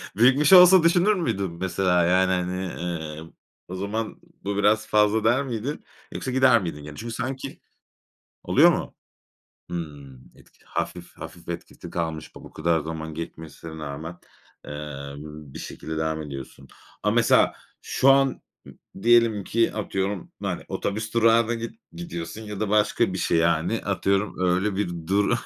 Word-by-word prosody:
Büyütmüş 135 - +5
olsa 180 -1 +9
düşünür 175 +5 +4
müydün, 105 - -1
mesela, 90 0 +1
yani, 95 +1 +3
hani, 90 +1 -1
eee, 80 -4 -5 0.5
o 95 - -6
zaman 105 +4 -3 0.2
bu 100 0 -2
biraz 105 +2 +3
fazla 105 +1 +3
der 120 +5 +3
miydin? 125 +3 -4 0.3
Yoksa 130 - -4
gider 130 -4 +5
miydin 75 -4 -5
yani? 75 0 -9
Çünkü 115 0 -6
sanki. 130 +2 -5 0.8
Oluyor - - +6
mu? - - -3 0.8
Hımm. 70 -7 -8
Etki - - -23
hafif, - - -5
hafif 85 0 -10
etkisi 85 0 -7
kalmış 80 -2 -4
bu - - -12
kadar 80 +1 +1
zaman 80 0 -6
geçmesine 80 0 -8
rağmen, 80 +3 -6 0.5
eee, 75 -1 -7
b 75 -1 -10
bir - - -7
şekilde 80 0 -6
devam 80 0 -1
ediyorsun 70 -2 -9 0.4
ama - - +1
mesela, - - +4 0.3
şu 135 - +2
an 135 -1 +2 0.2
m - - -12 0.3
diyelim 115 -4 +4
ki 115 +3 +1
atıyorum, 100 -2 -3
hani, - - -3
otobüs 110 +2 -3
durağına 115 0 +4
git 115 0 -4 0.2
gidiyorsun 95 - -6
ya 105 -2 -7
da 110 -2 -1
başka 105 -1 +2
bir - - -3
şey, 85 - +1
yani, 85 +6 +1
atıyorum 100 +1 0
öyle 95 +2 +1
bir 100 -3 -1 0.2
du 100 +5 +2
95 Hz, 150 wpm, -25 LUFS, 80-115 Hz, 0.8 s, olsa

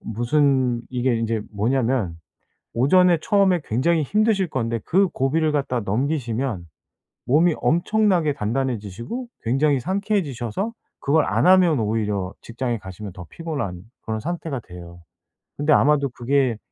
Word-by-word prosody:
무슨 125 +1 +1
이게 125 -1 0
인제 115 -1 -1
뭐냐면 115 -3 0 0.6
오전에 175 +8 +4
처음에 195 -2 +3
굉장히 155 +8 +1
힘드실 210 +2 +1
건데 115 -3 -2
그 190 +2 +3
고비를 155 +4 0
갖다 135 -4 -1
넘기시면 115 - -2 0.6
몸이 160 +5 +4
엄청나게 175 -3 +2
단단해지시고 120 - -3 0.2
굉장히 135 +4 +2
상쾌해지셔서 190 - -2 0.3
그걸 150 +2 +2
안 - - +1
하면 180 -6 +5
오히려 105 -3 -1
직장에 120 +1 -3
가시면 95 0 -9
더 90 -1 -10
피곤한 140 - -5 0.2
그런 110 -1 -3
상태가 160 -3 -4
돼요. 85 -2 -12 0.6
근데 145 +1 +1
아마도 140 -1 +3
그게 125 -1 0
135 Hz, 310 characters per minute, -22 LUFS, 115-165 Hz, 0.6 s, 하면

